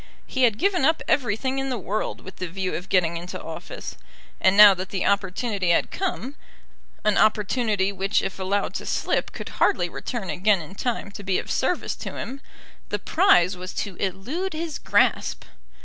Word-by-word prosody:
He 260 -1 +2
had 225 -3 +2
given 370 -4 +1
up 320 +3 +3
everything 260 +2 +1
in 270 0 -2
the 250 - -1
world 205 +1 -3
with 190 - -11
the 185 - -3
view 185 +2 -3
of 180 +3 -5
getting 170 -2 +2
into 175 +2 -6
office; - - -8 0.4
and 190 +1 +4
now 210 -1 +11
that 185 +1 -5
the 190 - -2
opportunity 200 0 0
had 170 - +2
come, 320 -8 -3 0.7
an 215 -1 +3
opportunity 210 -2 +2
which 195 0 0
if 195 - -4
allowed 195 +2 -1
to - - -5
slip - - 0
could - - -7
hardly - - +3
return 220 -9 -4
again 195 +5 +2
in 160 +2 -9
time 225 -1 -3
to 200 - -9
be 190 -2 0
of - - -4
service - - 0
to - - -6
him, 270 +3 -6 0.5
the - - 0
prize 255 - +4
was 180 0 -8
to 200 -3 -3
elude 245 - -3
his 315 0 -4
grasp! - - +2
200 Hz, 180 wpm, -24 LUFS, 190-255 Hz, 0.7 s, now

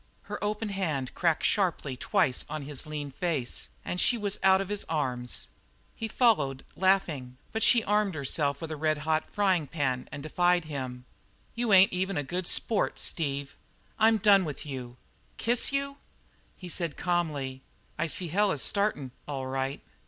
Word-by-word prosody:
Her 205 0 -6
open 210 +1 -1
hand 155 -10 -2
cracked 170 -3 +1
sharply 170 -9 +1
twice 140 -1 +1
on 155 -2 -4
his 145 +1 -4
lean 145 -2 -4
face 150 -5 -1 0.2
and 180 - -1
she 245 - +3
was 205 -2 -1
out 190 0 +6
of 195 -1 -3
his 205 -1 0
arms. 130 -6 -2 0.5
He 225 - -3
followed, 150 - +2
laughing, 165 -10 +1
but 220 - -2
she 235 -1 +5
armed 210 -3 +1
herself 140 0 0
with 165 -1 -5
a - - -2
red 155 0 +1
hot 155 0 +1
frying 190 -7 +2
pan 130 -5 -1
and 140 +1 -6
defied 175 +2 +2
him. 130 -4 -5 0.5
"You 235 -2 -1
ain't 190 0 +7
even 190 +2 -1
a 145 - 0
good 175 +5 -3
sport, 220 -3 +1
Steve. 140 -3 -2 0.4
I'm 220 +1 +5
done 200 -2 +6
with 150 -4 -5
you! 125 -4 -6 0.4
Kiss 240 +3 +1
you?" 280 0 -2 0.6
He 180 - -8
said 170 -2 -2
calmly: 150 -7 -1 0.4
"I 165 - +1
see 170 +4 -2
the 165 - -6
hell 205 +1 +3
is 140 - -1
startin', 200 -11 0 0.2
all 135 -2 -3
right." 135 +1 -2
165 Hz, 170 wpm, -29 LUFS, 140-195 Hz, 0.6 s, ain't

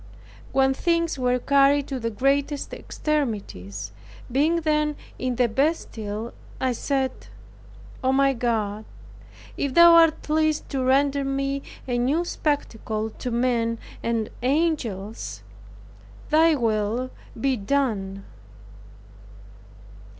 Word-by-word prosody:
When 270 0 +3
things 335 0 0
were 250 0 +2
carried 280 +2 +3
to 270 -2 -3
the 230 -1 -2
greatest 275 +5 0
extremities, 210 - -3 0.4
being 310 +6 +2
then 300 -1 +1 0.2
in 255 -1 -1
the 245 0 +3
Bastile, 225 -5 -2 0.3
I 260 -1 +1
said, 265 +2 0 0.9
"O, 260 - +3
my 275 0 +3
God, 220 -3 -1 0.7
if 280 -2 -2
thou 340 0 +9
art 330 -1 +5
pleased 310 0 +1
to 270 -2 -1
render 275 +2 +2
me 275 0 -1 0.3
a 245 -1 0
new 290 +8 +1
spectacle 225 -9 -2
to 250 - -5
men 235 -1 +1 0.2
and 230 -2 -1
angels, 250 - -1 0.9
Thy 320 +1 +5
holy - - 0
will 225 +2 0 0.3
be 270 +2 +1
done!" 200 -5 -1
265 Hz, 110 wpm, -24 LUFS, 230-290 Hz, 0.9 s, thou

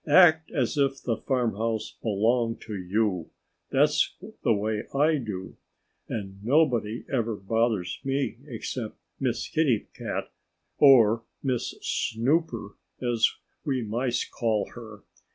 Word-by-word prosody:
Act 160 0 +6
as 140 -2 0
if 135 -1 +2
the 115 - 0
farmhouse 115 -3 -1
belonged 115 +2 +1
to 110 - -6
you. 95 -2 0 0.4
That's 145 +2 +3 0.3
the 120 - +3
way 105 0 0
I 150 +3 +4
do. 105 -8 -6 0.5
And 100 -2 -5
nobody 120 -5 +2
ever 115 -4 0
bothers 105 -2 0
me, 135 -3 -1
except 115 -2 -5 0.2
Miss 120 -4 -1
Kitty 140 -9 +1
Cat - - -4 0.5
or 115 -6 +7 0.2
Miss 130 -4 -1
Snooper, 120 -3 0 0.2
as 120 -3 +3 0.3
we 135 -5 -1
Mice 120 +3 -1
call 110 -3 -1
her. 110 -4 -11
115 Hz, 115 wpm, -27 LUFS, 110-135 Hz, 0.5 s, or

